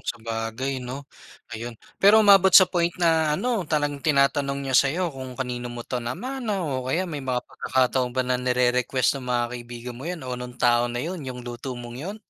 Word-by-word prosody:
sabagay 115 +3 -4
'no. 125 +3 -7 0.5
Ayun. 115 +1 -6 0.2
Pero 215 +2 +7
umabot 195 -2 +7
sa 185 - +11
point 170 -1 0
na 160 -3 +2
ano, 235 -6 -1
talagang 145 -2 0
tinatanong 140 -1 +1
niya 135 - -3
sayo 160 +5 +2
kung 130 -1 -8
kanino 125 -2 -4
mo 120 0 -7
'to 125 - -3
namana, 210 - -3
o 130 -4 -3
kaya 170 +8 0
may 155 -6 -5
mga 125 -2 -2
pagkakataon 130 -1 0
ba 130 - +3
na 125 0 0
nirerequest 125 +1 +1
ng 125 - -9
mga 120 -1 +1
kaibigan 120 0 -8
mo 135 - -8
yan 175 -6 -5
o 130 - -4
nung 125 0 -8
tao 120 0 +3
na 120 +1 -3
yun, 175 0 -4
yung 125 -3 -7
luto 120 +2 -6
mong 120 0 -8
yun? 195 +7 -5
130 Hz, 195 wpm, -24 LUFS, 125-160 Hz, 0.5 s, sa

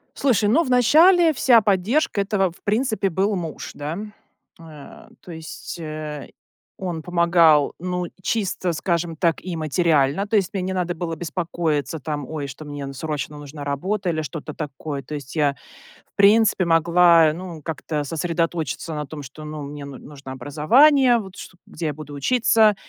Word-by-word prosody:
Слушай, 220 -7 +2
ну, 305 +10 +4
в 260 - -5
начале 320 +7 +5
вся 245 -4 +5
поддержка 210 - +1
этого, 195 -3 0
в - - -21
принципе, 215 -1 0
был 195 +4 0
муж, 165 -4 -5
да. 150 +4 -5 0.6
Э, 155 -3 -13
то 180 - -11
есть, 160 +1 -8
э, 155 -2 -6 0.5
он 175 -4 -4
помогал, 170 -4 +4
ну, 180 0 -3 0.2
чисто, 190 -3 -1
скажем 170 0 -1
так, 165 0 0
и 180 -2 -4
материально- 155 +1 +1
то 220 - -1
есть 195 -2 +1
мне 195 - -2
не 190 +1 -3
надо 180 -1 -1
было 165 -1 -4
беспокоиться 160 -3 -2
там, 145 -2 -5
ой, 150 -3 -4
что 140 +3 -9
мне 145 -1 -6
н 135 0 -6
срочно 150 +1 -4
нужна 145 0 -9
работа 185 +8 -2
или 155 -2 -1
что-то 155 +1 -7
такое. 145 -1 -5
То 150 - -7
есть 140 +1 -8
я, 145 -2 +2 0.6
в - - -73
принципе, 205 -1 +4
могла 170 -1 +5
ну 170 -1 -8
как-то 155 -2 -3
сосредоточиться 165 0 -2
на 150 -2 -4
том, 145 -1 -8
что, 140 +3 -11
ну, 150 -1 -6
мне 145 0 -7
ну 140 -2 -9
нужно 140 -2 -11
образование, 240 - +4
вот, 190 -3 -9
что, 185 - -11
где 165 0 -5
я 150 - -2
буду 150 -2 -9
учиться, 220 - +3
165 Hz, 170 wpm, -22 LUFS, 150-195 Hz, 0.6 s, начале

